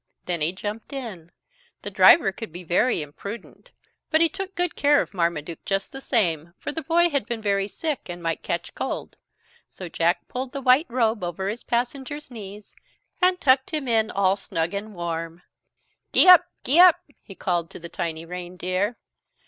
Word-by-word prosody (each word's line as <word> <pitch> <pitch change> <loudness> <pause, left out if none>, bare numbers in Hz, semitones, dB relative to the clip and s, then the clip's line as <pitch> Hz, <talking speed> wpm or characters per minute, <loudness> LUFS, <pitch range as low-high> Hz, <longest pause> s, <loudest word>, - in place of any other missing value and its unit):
Then 175 -3 -2
he 155 +3 +2
jumped 210 +7 -6
in. 205 -11 -7 0.5
The - - -4
driver 200 -13 +6
could 220 +1 -8
be 175 +2 -8
very 175 +2 +1
impudent, 200 +10 -10 0.4
but 315 - +3
he 330 0 +5
took 390 +1 -6
good 355 -1 -1
care 290 0 +4
of - - -3
Marmaduke 170 -3 -2
just 195 0 -2
the 270 - -8
same, 170 - +1
for - - -5
the 320 - -4
boy 340 +3 +2
had 280 -7 -1
been 235 -1 -3
very 200 -2 0
sick 280 - -4
and 175 0 -6
might 165 -1 -2
catch 170 - -4
cold. - - -5 0.5
So 180 -2 -9
Jack 170 +2 0
pulled 255 0 -5
the 275 - -3
white 260 +5 +4
robe 230 -4 0
over 180 +3 -3
his 225 +3 -5
passenger's 265 +4 -3
knees, 205 -2 -10 0.5
and 365 0 +3
tucked 265 +1 +3
him 290 -4 -3
in 225 -2 +2
all 195 -2 +2
snug 165 -3 -3
and 205 +1 -5
warm. 165 0 -5 0.7
"Gee - - +7
up, 365 -3 +9 0.2
gee 290 +7 +4
up!" 360 -2 +7 0.2
he 195 - -13
called 175 -3 -1
to - - -10
the 170 - -8
tiny 165 -1 -4
reindeer. 180 +4 -3
205 Hz, 180 wpm, -24 LUFS, 175-270 Hz, 0.7 s, up